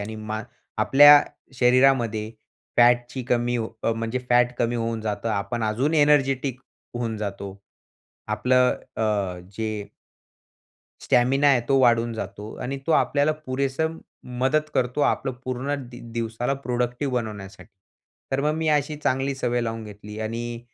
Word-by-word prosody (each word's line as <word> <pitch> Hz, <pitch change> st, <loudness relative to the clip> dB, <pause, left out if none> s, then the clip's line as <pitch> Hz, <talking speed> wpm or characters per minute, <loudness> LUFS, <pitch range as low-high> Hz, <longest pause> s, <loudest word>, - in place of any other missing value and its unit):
आणि 110 Hz, +2 st, -6 dB
मा 110 Hz, 0 st, -5 dB, 0.4 s
आपल्या 145 Hz, +1 st, +8 dB, 0.3 s
शरीरामध्ये 125 Hz, -4 st, +3 dB, 0.5 s
फॅटची 120 Hz, +2 st, +3 dB
कमी 120 Hz, 0 st, 0 dB
हो 115 Hz, -1 st, -2 dB
अ, 115 Hz, -, +1 dB
म्हणजे 115 Hz, +2 st, -3 dB
फॅट 120 Hz, 0 st, +4 dB
कमी 120 Hz, 0 st, 0 dB
होऊन 115 Hz, -1 st, -2 dB
जातं. 105 Hz, 0 st, -3 dB
आपण 100 Hz, +3 st, -2 dB
अजून 125 Hz, +9 st, 0 dB
एनर्जेटिक 135 Hz, -3 st, +2 dB, 0.3 s
होऊन 115 Hz, -2 st, -3 dB
जातो. 100 Hz, -2 st, -5 dB, 0.7 s
आपलं 125 Hz, +4 st, +3 dB, 0.2 s
अ, -, -, -3 dB
अ, 100 Hz, -4 st, -1 dB, 0.2 s
जे 110 Hz, -2 st, -3 dB, 1.2 s
स्टॅमिना 135 Hz, +4 st, +3 dB
आहे 135 Hz, -3 st, +4 dB
तो 135 Hz, -, +5 dB
वाढून 120 Hz, -2 st, +3 dB
जातो 105 Hz, -1 st, -7 dB
आणि 135 Hz, +2 st, -3 dB
तो 165 Hz, -, +2 dB
आपल्याला 145 Hz, 0 st, +2 dB
पुरेसं 140 Hz, +5 st, -1 dB, 0.4 s
मदत 150 Hz, +4 st, +1 dB
करतो. 125 Hz, +3 st, 0 dB
आपलं 135 Hz, -, +1 dB
पूर्ण 130 Hz, +3 st, -2 dB, 0.2 s
दि 120 Hz, 0 st, -11 dB
दिवसाला 115 Hz, +3 st, -2 dB
प्रोडक्टिव्ह 125 Hz, +2 st, -1 dB
बनवण्यासाठी. 105 Hz, -4 st, -5 dB, 0.6 s
तर 135 Hz, -, +1 dB
मग 150 Hz, +2 st, +1 dB
मी 160 Hz, 0 st, -1 dB
अशी 150 Hz, 0 st, +1 dB
चांगली 135 Hz, -1 st, -1 dB
सवय 120 Hz, -2 st, -1 dB
लावून 115 Hz, -1 st, -3 dB
घेतली 105 Hz, 0 st, -10 dB
आणि 115 Hz, +2 st, -4 dB
120 Hz, 140 wpm, -24 LUFS, 110-135 Hz, 1.2 s, आपल्या